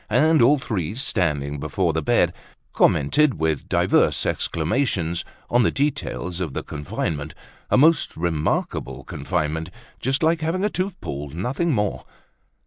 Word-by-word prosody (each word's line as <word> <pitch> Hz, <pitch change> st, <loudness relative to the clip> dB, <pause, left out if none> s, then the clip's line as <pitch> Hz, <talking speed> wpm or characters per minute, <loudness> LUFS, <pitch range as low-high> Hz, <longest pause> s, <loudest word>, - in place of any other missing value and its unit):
And 150 Hz, +6 st, +4 dB
all 140 Hz, +6 st, +6 dB
three, 100 Hz, -, -3 dB
standing 75 Hz, -, 0 dB
before 80 Hz, +3 st, 0 dB
the 80 Hz, -, 0 dB
bed, -, -, +2 dB, 0.4 s
commented 135 Hz, -, +3 dB
with 80 Hz, -3 st, -1 dB
divers -, -, +2 dB
exclamations 85 Hz, -, 0 dB, 0.2 s
on 120 Hz, -, +3 dB
the 115 Hz, -, +3 dB
details 140 Hz, -, -2 dB
of 85 Hz, -7 st, -3 dB
the -, -, -3 dB
confinement—a 75 Hz, -, -4 dB
most 155 Hz, +3 st, +4 dB
remarkable 80 Hz, -2 st, -1 dB
confinement, 80 Hz, +1 st, -2 dB, 0.3 s
just 135 Hz, +5 st, 0 dB
like 160 Hz, +1 st, +2 dB
having 175 Hz, +5 st, 0 dB
a 210 Hz, -, 0 dB
tooth 185 Hz, 0 st, -3 dB
pulled, 70 Hz, +1 st, -6 dB
nothing 130 Hz, -, -1 dB
more. 105 Hz, -6 st, -1 dB
90 Hz, 135 wpm, -23 LUFS, -, 0.4 s, all